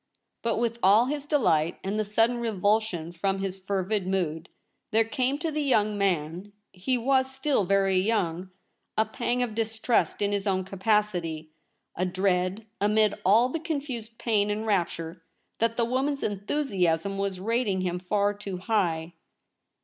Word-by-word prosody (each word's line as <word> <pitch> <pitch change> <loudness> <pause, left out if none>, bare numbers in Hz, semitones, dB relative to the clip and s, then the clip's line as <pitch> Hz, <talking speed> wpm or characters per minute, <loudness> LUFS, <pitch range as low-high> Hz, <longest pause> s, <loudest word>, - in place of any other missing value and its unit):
But 230 -1 0
with 235 0 -1
all 205 +5 +6
his 290 +2 -3
delight, 170 - +2
and 200 +3 -2
the - - +2
sudden 225 +3 +2
revulsion 210 -6 0
from 195 +3 -1
his 195 -1 -4
fervid 190 +1 -1
mood, 175 -3 -1 0.4
there 225 0 +3
came 255 +4 -1
to 325 +1 -2
the 305 0 -1
young 215 -7 +2
man 185 0 -1
— - - -52
he 195 +8 -1
was 260 +2 +2
still 265 -5 0
very 195 0 +3
young 185 -3 0 0.2
— - - -51
a 220 - +4
pang 240 +3 -1
of 235 -3 -3
distrust 225 +1 0
in 205 0 +1
his 200 0 -1
own 190 -1 +1
capacity, 185 -5 -1 0.4
a 180 - -1
dread, 185 +2 0 0.2
amid 210 0 +3
all 220 +7 +5
the 325 - -3
confused 275 -8 -4
pain 210 -3 +1
and 210 +2 -2
rapture, 170 -4 -1 0.4
that 230 0 +1
the 235 - +3
woman's 270 +4 -1
enthusiasm 195 - 0
was 195 -2 -2
rating 215 -2 0
him 180 -1 -1
far 205 +2 +1
too 200 -2 -6
high. 175 -5 0
205 Hz, 160 wpm, -27 LUFS, 185-230 Hz, 0.4 s, all